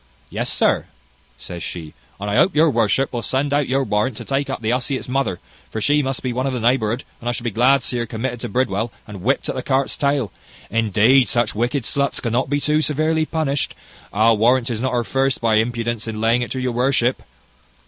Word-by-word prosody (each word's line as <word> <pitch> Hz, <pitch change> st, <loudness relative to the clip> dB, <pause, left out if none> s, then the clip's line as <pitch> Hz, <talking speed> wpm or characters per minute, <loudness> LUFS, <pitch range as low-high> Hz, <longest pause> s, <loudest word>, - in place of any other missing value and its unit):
"Yes, -, -, -1 dB
sir," -, -, +2 dB, 0.5 s
says 85 Hz, +7 st, -8 dB
she; 80 Hz, -3 st, -6 dB, 0.3 s
"and 100 Hz, -, -4 dB
I 100 Hz, -, -1 dB
hope 185 Hz, -, +3 dB
your 155 Hz, +1 st, +5 dB
worship 120 Hz, +3 st, +1 dB
will 120 Hz, -, -2 dB
send 140 Hz, +4 st, 0 dB
out 145 Hz, -1 st, +2 dB
your 135 Hz, +1 st, +2 dB
warrant 105 Hz, +2 st, 0 dB
to -, -, -7 dB
take 140 Hz, +1 st, -1 dB
up -, -, -3 dB
the 110 Hz, -1 st, -1 dB
hussy 125 Hz, +2 st, 0 dB
its -, -, -8 dB
mother, 130 Hz, -8 st, -1 dB, 0.3 s
for 110 Hz, -, -4 dB
she 145 Hz, +6 st, +3 dB
must 135 Hz, -2 st, -3 dB
be 125 Hz, -2 st, -1 dB
one 130 Hz, +2 st, -1 dB
of 135 Hz, -, -1 dB
the 125 Hz, -, -2 dB
neighbourhood; 120 Hz, 0 st, +1 dB, 0.2 s
and 120 Hz, -, -3 dB
I -, -, +2 dB
should 120 Hz, -, -4 dB
be 120 Hz, -, -1 dB
glad 125 Hz, +6 st, +4 dB
to -, -, -6 dB
see 125 Hz, -, -2 dB
her 120 Hz, -, -2 dB
committed 120 Hz, +2 st, -4 dB
to 120 Hz, -, -5 dB
Bridewell, 115 Hz, -1 st, 0 dB
and 105 Hz, -3 st, -9 dB
whipt 130 Hz, +8 st, 0 dB
at -, -, -1 dB
the 130 Hz, -, -3 dB
cart's 135 Hz, +1 st, 0 dB
tail. 140 Hz, -6 st, 0 dB, 0.4 s
Indeed, 115 Hz, +4 st, +4 dB
such 120 Hz, -3 st, +1 dB
wicked 120 Hz, +4 st, -1 dB
sluts 140 Hz, +3 st, 0 dB
cannot 120 Hz, +2 st, -1 dB
be 145 Hz, 0 st, +1 dB
too 150 Hz, +1 st, +2 dB
severely 155 Hz, +1 st, +1 dB
punished. 145 Hz, -4 st, -1 dB, 0.4 s
I'll 110 Hz, +1 st, +3 dB
warrant 120 Hz, +2 st, +4 dB
'tis 115 Hz, -2 st, -3 dB
not 130 Hz, 0 st, -1 dB
her 120 Hz, -1 st, +1 dB
first, 135 Hz, +2 st, 0 dB
by 115 Hz, -2 st, +2 dB
her -, -, +6 dB
impudence 115 Hz, -1 st, -3 dB
in 110 Hz, -1 st, -4 dB
laying 115 Hz, +2 st, +2 dB
it 120 Hz, -, -3 dB
to 130 Hz, -, -3 dB
your 125 Hz, -1 st, -1 dB
worship." 125 Hz, 0 st, +1 dB
125 Hz, 235 wpm, -21 LUFS, 115-135 Hz, 0.5 s, her